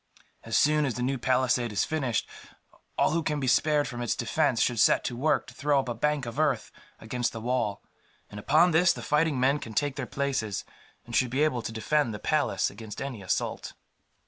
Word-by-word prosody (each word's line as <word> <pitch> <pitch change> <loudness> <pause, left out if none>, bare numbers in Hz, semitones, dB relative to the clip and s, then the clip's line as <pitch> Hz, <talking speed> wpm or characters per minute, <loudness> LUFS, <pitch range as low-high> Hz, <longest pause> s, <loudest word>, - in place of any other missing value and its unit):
"As 115 - 0
soon 150 0 +3
as 120 - -3
the 125 - -3
new 135 +1 -1
palisade 125 -1 +1
is 105 - +1
finished, 135 -7 -1 0.7
all - - +3
who 165 +1 +1
can 150 -2 -2
be 135 - -2
spared 145 +3 +2
from 120 -3 -6
its 120 - 0
defence 145 -7 0
should 120 -1 +1
set - - +4
to 120 - -3
work 145 +6 +1
to 130 - -13
throw 140 +2 +1
up 130 -2 -3
a - - -1
bank 150 +3 -1
of 120 +5 -6
earth 145 -7 0 0.3
against 120 +2 -2
the 115 - -5
wall; 115 -3 -1 0.4
and 105 - -9
upon 155 - +4
this 170 +2 +4
the - - -8
fighting 150 -2 +1
men 135 +3 +2
can 110 -5 -9
take 145 -2 0
their 130 -3 -3
places, 135 -8 -2 0.4
and 120 - -6
should 130 - +3
be 135 +5 +1
able 130 -6 +1
to 110 - -5
defend 120 +1 0
the - - -7
palace - - 0
against 110 -2 -9
any 135 -6 -5
assault." 95 - -2
130 Hz, 215 wpm, -27 LUFS, 120-150 Hz, 0.7 s, set